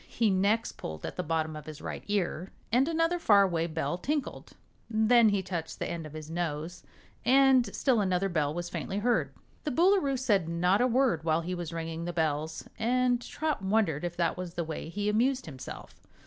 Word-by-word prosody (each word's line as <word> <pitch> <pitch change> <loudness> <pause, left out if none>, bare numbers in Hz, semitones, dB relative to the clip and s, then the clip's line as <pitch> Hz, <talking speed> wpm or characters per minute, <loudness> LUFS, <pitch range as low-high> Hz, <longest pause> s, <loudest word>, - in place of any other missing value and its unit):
He 225 -3 +1
next 200 +4 +1
pulled 80 0 -6
at - - -5
the - - -2
bottom 160 -1 -1
of 150 -1 -9
his 155 -1 -8
right - - -6
ear, 190 -3 -1 0.2
and 255 +5 +3
another 330 +1 +1
far 205 -10 +6
away 170 -3 0
bell 165 +2 -2
tinkled; 290 +5 -3 0.4
then 220 +1 +5
he 200 -2 0
touched 175 -3 -5
the - - -3
end 165 -2 -5
of 150 - -13
his 155 -1 -7
nose 165 0 -4 0.4
and 260 0 +5
still 250 -6 +2
another 185 0 +1
bell 155 -5 0
was 175 +2 -4
faintly 195 - -4
heard. 240 +4 +1 0.3
The - - -1
Boolooroo 335 -2 +3
said 205 -10 +1
not 180 +5 +2
a 250 - +4
word 245 - +2
while 160 0 +2
he 180 +2 -4
was 175 -2 -4
ringing 165 0 -4
the 175 - -3
bells, 160 -1 -1
and 245 +1 +2
Trot 305 +1 -3
wondered 190 -6 +1
if 175 0 -4
that 175 +1 0
was 180 -1 -6
the 170 - -1
way 160 0 -6
he 205 +4 -3
amused 250 +5 +1
himself. 135 -5 -10
185 Hz, 200 wpm, -29 LUFS, 165-240 Hz, 0.4 s, far